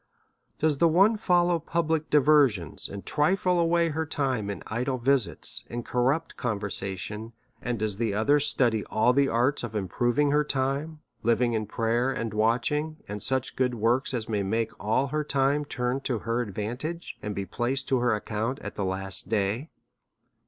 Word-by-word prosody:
Does 150 -3 +1
the 170 - +5
one 195 +7 +4
fol 180 -5 +3
low 175 -1 +1
public 160 -1 -1
diversions, 140 - +3
and 100 0 -8
trifle 180 +3 +2
away 170 0 +2
her 160 +1 -1
time 130 -9 -2
in 100 -3 -5
idle 125 +4 -2
visits 130 -2 +3
and 120 0 -5
corrupt 135 +6 0
conversation; 105 -1 -4 0.3
and 120 -1 -2
does 105 -2 -2
the 115 -1 0
other 110 +9 +3
study 120 -6 +2
all 110 +3 +2
the 140 +1 +3
arts 125 +4 +1
of 115 -2 -5
improving 120 +8 +1
her 150 +1 +3
time, 145 +3 -2 0.2
living 120 +1 +2
in 110 -2 -1
prayer 115 +4 0
and 115 -4 -3
watching, 125 +8 0
and 105 0 -5
such 130 +2 -2
good 125 -1 +1
works 120 +4 +1
as 120 -4 -3
may 105 -2 -1
make 110 +3 -1
all 110 +6 +2
her 150 +2 -1
time 145 +1 +1
turn 125 -1 -2
to 125 -3 -1
her 115 +3 -1
advantage, 120 - -5
and 105 -1 -4
be 100 - -3
placed 130 +5 -2
to 130 - +3
her 120 -2 +2
account 110 +4 -3
at - - -6
the 100 - -3
last 95 +1 -4
day? 110 +7 -1
125 Hz, 175 wpm, -27 LUFS, 110-145 Hz, 0.3 s, the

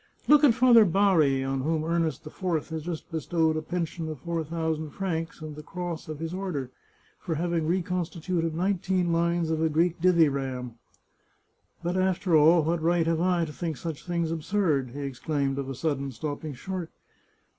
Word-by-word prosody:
" - - -33
Look 300 0 +6
at 255 -6 +6
Father 245 -3 +7
Bari, 165 -8 +3
on 135 0 -1
whom 155 +2 0
Ernest 165 -1 -1
IV 165 0 -2
has 160 -1 -4
just 170 +1 -6
bestowed 160 0 +1
a 155 - -1
pen 170 +2 -2
sion 160 0 -6
of 155 - -5
four 170 +2 -2
thousand 160 -1 -2
francs 165 -2 -4
and 155 -1 -7
the 150 - -8
cross 175 +1 -5
of 155 -1 -5
his 165 +2 -5
order, 175 -9 -3 0.5
for 165 - -3
having 170 0 -1
reconstituted 175 -1 -1
nineteen 185 -1 0
lines 170 -1 +1
of 160 0 0
a 160 - +3
Greek 165 +2 +1
dithyramb! 140 -8 +2 0.6
" - - -39
But, 175 +2 -1
after 185 -2 +2
all, 160 +2 +6
what 165 +1 0
right 170 0 +2
have 165 0 +1
I 175 -2 +2
to 150 - -8
think 165 -4 -4
such 160 -1 -6
things 170 -2 -1
absurd? 160 -5 0
" - - -14
he 145 - -4
exclaimed 140 +1 -2
of 135 -1 -4
a 135 - -4
sudden, 140 -2 -2
stopping 145 +3 -5
short. 185 +3 -5
165 Hz, 190 wpm, -27 LUFS, 155-175 Hz, 0.6 s, Father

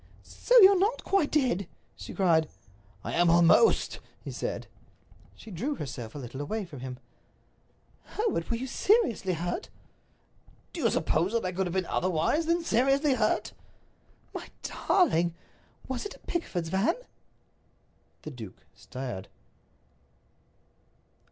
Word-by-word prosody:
"So - - +4
you're 385 0 +8
not 430 +6 +1
quite 390 -7 +2
dead?" 245 - +1 0.3
she - - -9
cried. 165 -5 +3 0.5
"I - - -4
am 175 0 +4
almost," 170 - +4 0.2
he - - -7
said. - - -4 0.7
She 220 - -12
drew 250 - -2
herself 125 - -7
a - - -5
little 130 0 -7
away 210 +8 -3
from 145 -6 -10
him. 125 0 -6 1.2
"Hereward, 420 - -1
were 235 - +1
you 255 - -4
seriously 265 - +2
hurt?" 175 - -3 1.0
"Do 340 - -5
you - - +3
suppose 170 +4 0
that 230 -4 0
I 180 - -1
could 185 +1 -1
have 175 - -4
been 190 -1 +1
otherwise 185 - 0
than 335 0 +2
seriously 275 +2 +3
hurt?" - - 0 0.8
"My - - -6 0.4
darling! 175 - +3 0.5
Was 260 -2 -3
it - - -11
a - - -18
Pickford's 180 - -3
van?" 195 - +2 1.3
The 155 - -6
duke 110 -8 -10
stared. 125 -8 -7
190 Hz, 130 wpm, -28 LUFS, -, 1.3 s, you're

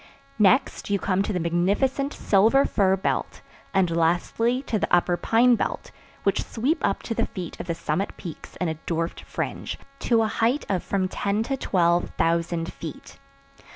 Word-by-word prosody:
Next 230 +5 +3
you 200 - +2
come 190 0 0
to 200 - -1
the 180 - -1
magnificent 200 - +1
silver 225 +7 +3
fir 190 -3 +2
belt 190 - -2 0.3
and 180 -3 +2
lastly 180 +10 +1
to 220 -6 -1
the - - -2
upper 175 0 +3
pine 235 +7 +4
belt, 235 - -2 0.3
which - - +1
sweep 260 +8 -1
up 195 - 0
to 230 - -3
the - - 0
feet 180 -4 -7
of - - -6
the 170 - -1
summit 165 +4 -2
peaks 170 -5 -9
in 180 - -2
a 160 -1 -3
dwarfed 165 0 -2
fringe, - - -4 0.2
to 230 -2 +2
a - - +1
height 230 +6 0
of 190 -3 +1
from 190 -2 -1
ten 200 +3 -1
to 270 +4 -2
twelve 175 -7 +1
thousand 170 0 0
feet. 160 -4 -9
195 Hz, 175 wpm, -25 LUFS, 170-230 Hz, 0.3 s, pine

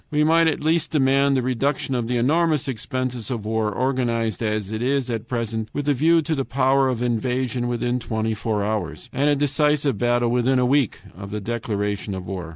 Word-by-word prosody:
"We 150 0 +2
might 165 +1 +4
at 155 -2 -1
least 160 0 +2
demand 140 -1 +3
the 130 - 0
reduction 135 +2 -1
of 120 -2 -1
the 125 0 0
enormous 155 +3 +2
expenses 130 -2 -3
of 115 -5 -4
war 110 -1 0
organized 115 -4 -1
as 105 -2 -2
it 110 0 -3
is 130 0 0
at 115 0 -4
present 115 -2 -3
with 145 0 -3
a 145 - +4
view 160 +5 +3
to 160 - -1
the 135 -3 -1
power 135 +1 +2
of 125 -2 -2
invasion 125 +1 -1
within 120 +1 -1
twenty 110 -1 -2
four 105 -1 -2
hours 105 +3 -3
and 145 +3 +2
a 145 - +4
decisive 145 -3 +1
battle 120 0 +2
within 125 +2 +2
a 125 - +3
week 135 -3 +1
of 100 +2 -8
the 105 +1 -4
declaration 105 -2 -3
of 95 -1 -6
war. 90 -3 -5
125 Hz, 205 wpm, -23 LUFS, 110-140 Hz, -, might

